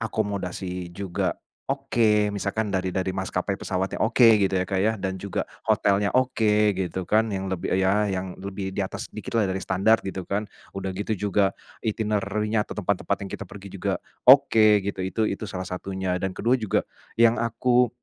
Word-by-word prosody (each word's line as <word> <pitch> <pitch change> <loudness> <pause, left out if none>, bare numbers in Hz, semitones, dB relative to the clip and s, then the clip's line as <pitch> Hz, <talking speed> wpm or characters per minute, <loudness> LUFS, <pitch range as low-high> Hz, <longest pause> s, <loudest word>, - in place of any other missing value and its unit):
akomodasi 95 -5 -3
juga 90 0 -2 0.3
oke, 115 -6 +2
misalkan 105 +1 -2
dari 95 -2 -1
dari 95 -1 -1
maskapai 95 0 -2
pesawatnya, 95 +1 -2
oke, 115 -1 +6
gitu 100 -2 +1
ya, 95 -1 0
Kak, 95 -1 0
ya, 110 - +3
dan 95 0 -2
juga 100 +1 -4 0.2
hotelnya 100 0 +2
oke, 105 -6 +2
gitu 95 -1 -3
kan. 110 +1 +3
Yang 95 -1 -2
lebih, - - -5
eee, 95 0 +2
ya 95 - +3 0.3
yang 95 -1 -7
lebih 95 0 -5
di 100 - -3
atas - - -6
dikitlah 110 -4 -1
dari 95 0 -2
standar, 100 +4 +3
gitu 95 -1 -5
kan. 100 +2 -1 0.3
Udah 95 -1 -3
gitu 105 +3 -2
juga, 100 0 +1 0.2
itinerary-nya 105 0 -1
atau - - -7
tempat-tempat 100 0 0
yang 95 - -8
kita 100 - -5
pergi 100 0 -10
juga - - 0 0.3
oke, 110 -6 +7
gitu. 100 -1 -3
Itu 95 +4 -3
itu 100 - -4
salah 95 -1 -4
satunya 95 0 -3
dan 95 -1 -3
ke-2 120 - +1
juga, 110 - 0 0.3
yang 115 0 +4
aku 120 +1 +2
100 Hz, 175 wpm, -25 LUFS, 95-110 Hz, 0.3 s, oke